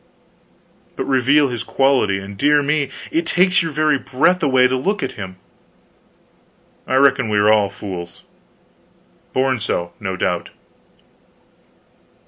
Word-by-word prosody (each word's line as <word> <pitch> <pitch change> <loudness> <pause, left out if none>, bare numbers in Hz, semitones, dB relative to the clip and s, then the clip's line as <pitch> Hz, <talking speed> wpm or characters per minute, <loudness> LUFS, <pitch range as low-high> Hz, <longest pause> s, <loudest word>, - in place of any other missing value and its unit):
But - - -3
reveal 135 +2 +3
his 120 -2 -4
quality, 135 -8 +1
and 100 +1 -8
dear 145 +6 +3
me 145 -1 0 0.2
it 165 - 0
takes 185 +2 +3
your 165 -1 -3
very 150 -1 +1
breath 160 +10 +1
away 130 -4 +4
to 130 - -1
look 200 +11 -2
at - - -3
him. 95 -3 -8 1.5
I 130 - 0
reckon 130 -3 +3
we 105 - 0
are 105 +1 +4
all 105 -2 +2
fools. 95 -3 -8 1.1
Born 130 -1 0
so, 85 -4 -3
no 95 -2 -4
doubt. 90 -1 -2
130 Hz, 130 wpm, -19 LUFS, 105-145 Hz, 1.5 s, away